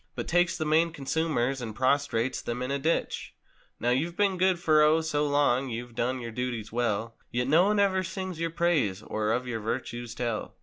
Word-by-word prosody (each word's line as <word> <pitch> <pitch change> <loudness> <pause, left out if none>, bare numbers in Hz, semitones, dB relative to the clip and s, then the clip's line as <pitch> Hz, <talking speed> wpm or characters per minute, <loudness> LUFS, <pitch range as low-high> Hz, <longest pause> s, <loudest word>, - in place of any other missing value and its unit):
But - - -4
takes 175 0 +2
the 155 - -2
main 160 +2 +3
consumers 135 -3 -1
and 110 -3 -5
prostrates 130 -2 +1
them 120 +1 -3
in 130 - -3
the 140 - 0
ditch. 160 +4 -1 0.4
Now 120 - +1
you've 160 +7 0
been 200 -2 +2
good 185 -1 +3
for 155 -2 +4
O, 155 +2 +5
so 150 -2 0
long—you've 125 -4 0
done 125 +3 -1
your 115 -1 -6
duties 120 -2 -4
well— 115 -1 -1 0.2
Yet 125 +1 -1
no 160 +6 +5
one 210 0 +2
ever 190 -2 +3
sings 185 -2 -5
your 165 0 0
praise, 155 - +1
or 110 0 -1
of 125 +3 0
your 120 -2 -3
virtues 120 +1 -4
tell. 115 -3 -3
135 Hz, 200 wpm, -28 LUFS, 120-165 Hz, 0.4 s, O